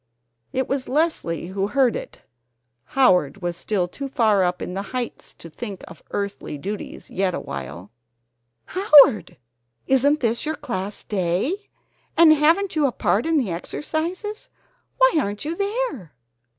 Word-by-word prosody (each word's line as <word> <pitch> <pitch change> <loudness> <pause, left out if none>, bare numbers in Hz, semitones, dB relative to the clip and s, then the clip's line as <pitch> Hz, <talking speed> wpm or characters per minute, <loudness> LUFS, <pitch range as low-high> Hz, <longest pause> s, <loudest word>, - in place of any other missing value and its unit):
It 260 - -1
was 270 -1 -2
Leslie 280 - 0
who 195 +1 -1
heard 250 +1 +2
it. - - -8 0.6
Howard 185 - +2
was 175 -1 -2
still 180 +1 -1
too 275 +10 -6
far 220 -8 +3
upon 180 0 -2
the 195 - -2 0.2
heights 245 -2 -5
to - - -11
think 195 +4 -7
of 165 - -13
earthly 200 -6 -4
duties 200 +8 -7
yet 190 -1 0
awhile. 80 - -7 0.7
"Howard! 295 - +5 0.5
Isn't 280 +3 +3
this 235 -1 0
your 315 +1 -2
Class 205 -7 -4
Day? 205 - -1 0.5
And 330 -2 +8
haven't 330 +6 +2
you 300 -2 +3
a - - -1
part 200 - 0
in 325 -1 +2
the 240 -10 0
exercises? 335 - -4 0.5
Why - - +5
aren't 205 +2 -4
you 320 +2 -2
there?" 400 - -3
240 Hz, 140 wpm, -23 LUFS, 185-310 Hz, 0.7 s, And